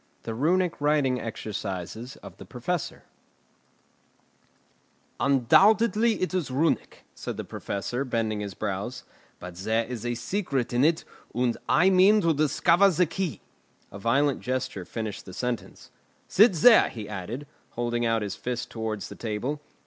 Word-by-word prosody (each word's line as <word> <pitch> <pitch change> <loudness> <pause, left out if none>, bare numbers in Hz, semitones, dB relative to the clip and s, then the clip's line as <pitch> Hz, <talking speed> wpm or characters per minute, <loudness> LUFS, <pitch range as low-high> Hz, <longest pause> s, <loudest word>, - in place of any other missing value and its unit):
THE 115 - -4
RUNIC 170 +7 +1
WRITING 145 -4 +2
EXERCISES 110 +1 -5 0.2
THE - - -11
PROFESSOR 140 +6 -4 2.2
"Undoubtedly 210 - +4
it 185 - -1
is 180 -7 -1
Runic," 145 +6 -1
said - - -6
the - - -4
Professor, 120 +6 -4
bending 115 -4 -1
his 100 -3 -5
brows; 105 +4 -4 0.4
"but 90 0 -9
there 110 +5 0
is 120 -2 -6
a 120 0 -1
secret 130 - -2
in 120 +2 +3
it, 160 +2 +3 0.3
and 120 -1 +1
I 185 +4 +5
mean 195 +3 +6
to 165 -3 +3
discover 165 +6 +4
the 180 0 +2
key." 170 0 -4 0.5
A 100 - -9
violent 135 +6 +2
gesture 130 -7 -3
finished 110 -1 -5
the 95 - -10
sentence. 125 +1 -5 0.4
"Sit 210 +3 +5
there," 225 +8 +6
he 110 -3 -7
added, 105 +7 -6 0.3
holding 120 0 -1
out 115 -2 +1
his 100 -1 -4
fist 125 -1 -4
towards 110 -2 -4
the - - -10
table. 120 +7 -3
125 Hz, 140 wpm, -26 LUFS, 110-165 Hz, 2.2 s, mean